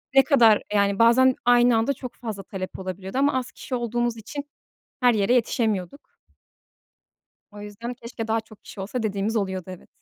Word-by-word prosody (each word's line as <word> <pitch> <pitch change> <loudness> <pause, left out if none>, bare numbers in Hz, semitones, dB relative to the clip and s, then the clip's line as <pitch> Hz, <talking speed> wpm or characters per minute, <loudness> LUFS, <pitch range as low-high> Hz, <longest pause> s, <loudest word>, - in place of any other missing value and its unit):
ne 270 - +8
kadar 235 -7 +5
yani, 200 0 +2
bazen 255 +3 +5
aynı 245 -1 +5
anda 230 +5 +1
çok 250 -1 -9
fazla 215 -5 -6
talep 185 -1 -7
olabiliyordu 190 +4 -6
ama 280 +1 +3
az 250 - -8
kişi 260 - -6
olduğumuz 240 -1 -1
için 280 +6 -7 0.6
her 245 -2 +4
yere 205 +3 +2
yetişemiyorduk. 220 -1 -1 1.4
O 205 0 -11
yüzden, 210 +4 -7
keşke 230 -2 -7
daha 225 0 +1
çok 220 -2 -18
kişi 200 - -12
olsa 225 +4 -4
dediğimiz 205 +2 -1
oluyordu, 190 -3 -1
evet. 185 -1 -10
225 Hz, 170 wpm, -24 LUFS, 200-245 Hz, 1.4 s, ne